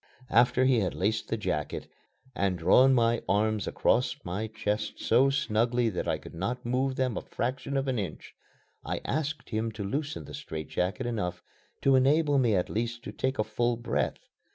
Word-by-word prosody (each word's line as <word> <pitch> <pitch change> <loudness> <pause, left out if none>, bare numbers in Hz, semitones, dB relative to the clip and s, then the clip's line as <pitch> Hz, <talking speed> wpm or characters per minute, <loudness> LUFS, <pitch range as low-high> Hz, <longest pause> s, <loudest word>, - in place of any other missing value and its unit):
After 125 +2 +4
he 130 -3 +4
had 95 -5 -1
laced 105 +4 0
the 115 - -1
jacket, 75 -8 -3 0.5
and 100 -5 0
drawn 95 +11 +6
my 115 -1 +3
arms 105 +1 +1
across 125 +1 +2
my 95 +5 -3
chest 110 0 -2
so 130 +4 +4
snugly 120 -2 +1
that 90 - -3
I - - +1
could - - -12
not 120 +9 -3
move 130 +2 0
them 130 -3 0
a - - -2
fraction 135 +3 -3
of 135 0 -1
an 130 -3 0
inch, 90 -7 -6 0.5
I - - -3
asked 155 +1 -2
him 110 +1 -1
to 105 -1 -5
loosen 145 +9 -3
the - - -10
strait 80 - -6
jacket 90 +7 -1
enough 90 -7 -3 0.4
to 135 -1 +5
enable 145 +2 +4
me 120 -5 +3
at 90 - +1
least 120 +1 -3
to - - -6
take 130 +1 -2
a 110 - +2
full 120 +2 0
breath. 120 - -1
120 Hz, 185 wpm, -29 LUFS, 105-130 Hz, 0.5 s, drawn